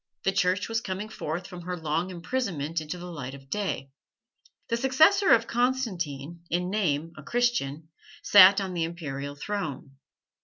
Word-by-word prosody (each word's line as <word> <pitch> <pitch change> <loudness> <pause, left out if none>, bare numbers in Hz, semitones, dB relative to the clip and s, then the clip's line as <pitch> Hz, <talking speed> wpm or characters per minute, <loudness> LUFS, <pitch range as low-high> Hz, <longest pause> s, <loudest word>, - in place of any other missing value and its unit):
The 195 - +2
Church 195 0 +1
was 225 0 -1
coming 195 +2 -4
forth 175 -3 -4
from 180 -2 -9
her 180 +1 -4
long 160 +3 -1
imprisonment 170 - -2
into 155 +3 -5
the 175 - -8
light 135 -5 -6
of 135 0 -15
day. 195 -10 -2 0.8
The 230 - +1
successor 310 - +4
of 230 0 +6
Constantine, 175 - -2
in 180 +2 -1
name 165 -6 0
a - - -8
Christian, 160 - -1 0.3
sat 200 0 +8
on 190 -2 -3
the 170 -2 -1
Imperial 145 -4 -5
throne. 145 -6 -5
180 Hz, 155 wpm, -27 LUFS, 155-210 Hz, 0.8 s, sat